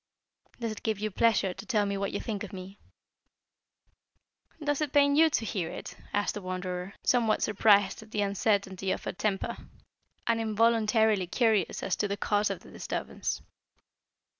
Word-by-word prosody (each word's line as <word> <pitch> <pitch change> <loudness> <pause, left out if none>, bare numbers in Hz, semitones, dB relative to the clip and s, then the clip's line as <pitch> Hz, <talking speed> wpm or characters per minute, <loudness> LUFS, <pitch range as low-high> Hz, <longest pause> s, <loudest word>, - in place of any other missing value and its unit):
"Does 230 -2 -2
it 215 - -7
give 220 -2 -1
you 215 +1 -2
pleasure 210 -3 +2
to 195 +3 -10
tell 215 -5 +2
me 200 0 -1
what 195 0 -2
you - - -2
think 215 -4 -4
of 210 - -7
me?" 190 +1 -9 1.8
"Does 290 -1 -1
it 295 -2 -1
pain 285 -1 +5
you 320 +2 +6
to 230 -6 0
hear 190 -6 -2
it?" - - -7 0.2
asked 205 0 0
the 205 - -6
Wanderer, 185 +1 -4
somewhat 230 -3 +2
surprised 205 -1 +4
at 220 - -14
the 210 -1 -1
uncertainty 200 -1 0
of - - -1
her - - -3
temper, 195 0 -2 0.7
and 230 -1 +1
involuntarily 220 -2 +3
curious 220 -3 +1
as 190 - 0
to 205 - 0
the 200 0 -3
cause 205 +1 +1
of - - -4
the - - -15
disturbance. - - -4
210 Hz, 170 wpm, -29 LUFS, 195-225 Hz, 1.8 s, you